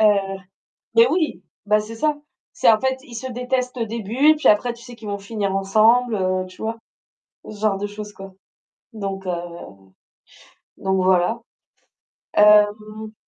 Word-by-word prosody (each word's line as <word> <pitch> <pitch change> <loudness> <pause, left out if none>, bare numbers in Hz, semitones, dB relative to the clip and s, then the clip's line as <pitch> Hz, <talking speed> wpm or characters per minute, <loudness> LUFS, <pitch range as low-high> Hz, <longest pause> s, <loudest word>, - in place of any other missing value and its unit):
Heu, 215 - +6 0.9
mais 230 +1 +7
oui! 315 0 -1 0.2
Bah 210 +1 +3
c'est 225 +2 -9
ça. 300 +4 0 0.4
C'est - - +5
en 215 - +3
fait 260 +1 0
ils 245 -5 -12
se 260 +3 -5
détestent 250 +1 -2
au 230 - -1
début 230 +6 +1
et - - +3
puis 305 - +1
après 215 +3 +3
tu 235 - -16
sais 245 0 -11
qu'ils 220 -2 -9
vont 200 - -2
finir 200 -1 -3
ensemble, 220 +5 +3
heu, 185 -1 0
tu 185 - -15
vois? 225 +1 -3 0.7
Ce 215 - -10
genre 205 -3 +1
de 205 - -3
choses 210 0 -8
quoi. 195 -1 -11 0.6
Donc, 195 -3 -5
heu - - 0 1.5
donc 190 0 0
voilà. 185 +4 +2 0.9
Hem 210 +1 +3
215 Hz, 165 wpm, -21 LUFS, 200-235 Hz, 1.5 s, mais